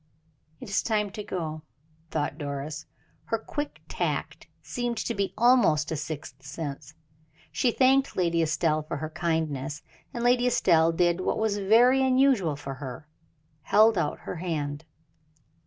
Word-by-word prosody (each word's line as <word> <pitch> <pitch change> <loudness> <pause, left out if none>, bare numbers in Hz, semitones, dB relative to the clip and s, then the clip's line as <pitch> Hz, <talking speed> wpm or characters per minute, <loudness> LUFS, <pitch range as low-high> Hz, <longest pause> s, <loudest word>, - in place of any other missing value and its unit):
"It - - -9
is 200 +1 +1
time 210 -3 0
to 210 +1 -6
go," 160 -6 -4 0.5
thought 150 -1 -2
Doris. 145 +1 -5 0.4
Her 225 - 0
quick 290 +6 -5
tact - - -3 0.2
seemed 240 -1 -3
to - - -2
be 200 -1 -1
almost 215 -11 +4
a - - 0
sixth 145 -3 -6
sense. 145 0 -7 0.6
She 210 - +1
thanked 265 +3 +3
Lady 170 -2 +2
Estelle 155 0 +1
for 155 - -5
her 155 0 -5
kindness, 160 -4 -2 0.3
and 235 - -4
Lady 245 0 +3
Estelle 165 -8 +4
did 175 +1 +1
what - - 0
was 215 -2 0
very 240 +7 +5
unusual 255 - +3
for 140 -1 -6
her 135 +2 -8 0.5
held 215 +8 +5
out 170 -5 -1
her - - -6
hand. 155 -3 -3
170 Hz, 145 wpm, -27 LUFS, 155-220 Hz, 0.6 s, very